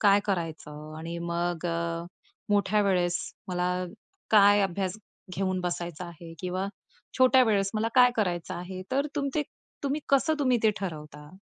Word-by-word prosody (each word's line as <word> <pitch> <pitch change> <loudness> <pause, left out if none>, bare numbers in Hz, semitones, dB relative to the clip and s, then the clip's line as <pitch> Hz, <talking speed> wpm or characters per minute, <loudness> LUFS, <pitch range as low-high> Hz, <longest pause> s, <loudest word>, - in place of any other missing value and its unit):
काय 205 -1 +6
करायचं? 155 -5 -4
आणि 170 +1 -5
मग 170 0 -2 0.8
मोठ्या 205 +1 +3
वेळेस 180 -3 +2 0.3
मला 180 0 0 0.5
काय 205 -1 +7
अभ्यास 190 0 -1 0.4
घेऊन 185 -1 0
बसायचा 175 -1 -3
आहे 170 0 -10
किंवा 185 +1 -2 0.5
छोट्या 260 0 +7
वेळेस 200 -3 +2
मला 220 +1 +1
काय 250 -1 +7
करायचं 175 -5 -1
आहे, 185 +1 -6
तर 280 +3 +1
तुम 280 -1 0
ते 300 - +2 0.4
तुम्ही, 285 +2 -1
कसं 280 +3 +3
तुम्ही 255 -4 +3
ते 220 - +5
ठरवता? 150 -5 -6
185 Hz, 140 wpm, -28 LUFS, 175-215 Hz, 0.8 s, काय